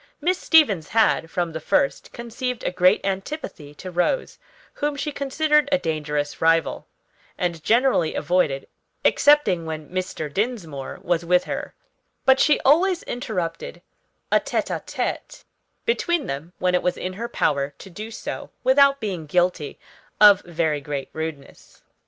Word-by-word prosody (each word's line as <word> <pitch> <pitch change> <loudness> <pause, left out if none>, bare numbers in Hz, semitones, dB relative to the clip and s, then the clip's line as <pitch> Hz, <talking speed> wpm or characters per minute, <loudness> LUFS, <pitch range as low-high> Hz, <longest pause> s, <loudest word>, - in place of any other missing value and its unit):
Miss 360 +4 0
Stevens 215 - +4
had, 215 -7 +2
from 175 -1 -2
the 160 - -4
first, 140 - 0
conceived 240 +1 -5
a - - -1
great 180 +2 +4
antipathy 195 - -5
to 185 +4 -8
Rose, 180 - -1 0.3
whom 295 0 -2
she 285 +2 -3
considered 295 +1 +1
a 280 - +4
dangerous 150 - -3
rival, 165 0 +2 0.5
and 170 -3 -2
generally 235 -8 +2
avoided, 150 -7 0 0.4
excepting 290 - +4
when 155 -1 -6
Mr. 185 -4 -3
Dinsmore 170 - -4
was 170 -1 0
with 180 +1 +3
her; - - -5 0.5
but 265 0 +5
she 300 - +4
always 345 +6 +3
interrupted 235 - -4 0.5
a - - +5
tête - - -2
à - - -7
tête - - -4 0.4
between 345 - 0
them 150 +6 -6
when 180 0 0
it 180 - +2
was 180 0 -1
in 185 - -4
her 230 +5 -5
power 140 -9 0
to 195 - -12
do 215 +5 -7
so 225 - -6
without 275 +1 +5
being 185 -8 -4
guilty 175 -2 0 0.4
of 205 -2 +8
very 160 -4 -1
great 140 -1 -5
rudeness. 160 -3 -8
185 Hz, 145 wpm, -23 LUFS, 160-265 Hz, 0.5 s, of